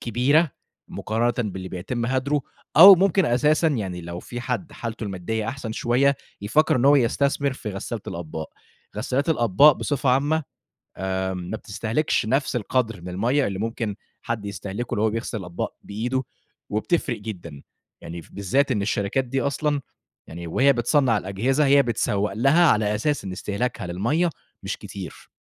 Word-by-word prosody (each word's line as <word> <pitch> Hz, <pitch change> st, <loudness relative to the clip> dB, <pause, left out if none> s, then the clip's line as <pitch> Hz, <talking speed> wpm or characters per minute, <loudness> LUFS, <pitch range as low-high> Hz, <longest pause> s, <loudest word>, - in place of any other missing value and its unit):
كبيرة 135 Hz, +7 st, +2 dB, 0.4 s
مقارنةً 115 Hz, +2 st, -1 dB, 0.2 s
باللي 95 Hz, 0 st, -6 dB
بيتم 110 Hz, +7 st, -3 dB
هدرُه، 135 Hz, +3 st, 0 dB, 0.4 s
أو 190 Hz, +4 st, +12 dB
ممكن 190 Hz, +1 st, +3 dB
أساسًا 150 Hz, +7 st, +3 dB
يعني 100 Hz, -, -3 dB
لو 85 Hz, 0 st, -7 dB
في 120 Hz, +5 st, -7 dB
حد 160 Hz, +7 st, -3 dB
حالته 115 Hz, -1 st, -5 dB
المادية 105 Hz, +3 st, -3 dB
أحسن 125 Hz, -4 st, -5 dB
شوية، 130 Hz, +5 st, +2 dB, 0.2 s
يفكّر 130 Hz, +9 st, +2 dB
إن 125 Hz, -, +1 dB
هو 145 Hz, +1 st, +7 dB
يستثمر 140 Hz, +2 st, +1 dB
في 120 Hz, -4 st, -6 dB
غسّالة 105 Hz, +3 st, -5 dB
الأطباق، 80 Hz, -2 st, -6 dB, 0.5 s
غسالات 140 Hz, +5 st, -1 dB
الأطباق 130 Hz, +1 st, +5 dB
بصفة 135 Hz, -1 st, -1 dB
عامة، 145 Hz, +5 st, +2 dB, 0.7 s
آآ، 95 Hz, 0 st, -1 dB
ما 90 Hz, +4 st, -5 dB
بتستهلكش 110 Hz, +5 st, -1 dB
نفس 135 Hz, +2 st, 0 dB
القدر 115 Hz, -3 st, -1 dB
من 90 Hz, -, -8 dB
المَيّة 120 Hz, +10 st, +1 dB
اللي 95 Hz, -1 st, -3 dB
ممكن 110 Hz, -1 st, -3 dB, 0.3 s
حد 110 Hz, -3 st, -3 dB
يستهلكه 100 Hz, +3 st, -4 dB
لو 105 Hz, -, 0 dB
هو 110 Hz, -, +3 dB
بيغسل 115 Hz, 0 st, -3 dB
الأطباق 90 Hz, -3 st, -5 dB
بإيدُه 125 Hz, +6 st, -2 dB, 0.5 s
وبتفرق 110 Hz, +3 st, 0 dB
جدًا، 85 Hz, -9 st, -8 dB, 0.4 s
يعني 85 Hz, 0 st, -7 dB
بالذات 130 Hz, +8 st, +1 dB
إن 105 Hz, -, 0 dB
الشركات 100 Hz, +5 st, 0 dB
دي 135 Hz, +2 st, -2 dB
أصلًا، 145 Hz, +1 st, 0 dB, 0.5 s
يعني 85 Hz, +1 st, -7 dB
وهي 135 Hz, +12 st, +4 dB
بتصنَّع 125 Hz, -2 st, +2 dB
الأجهزة، 120 Hz, +10 st, 0 dB
هي 140 Hz, +1 st, +6 dB
بتسوّق 105 Hz, -4 st, 0 dB
لها 135 Hz, -, +4 dB
على 105 Hz, -1 st, +2 dB
أساس 145 Hz, +6 st, -1 dB
إن 95 Hz, -, -5 dB
استهلاكها 100 Hz, +3 st, -3 dB
للمَيّة 120 Hz, -, 0 dB, 0.3 s
مش -, -, -3 dB
كتير. 95 Hz, -4 st, -9 dB
115 Hz, 155 wpm, -24 LUFS, 100-140 Hz, 0.7 s, أو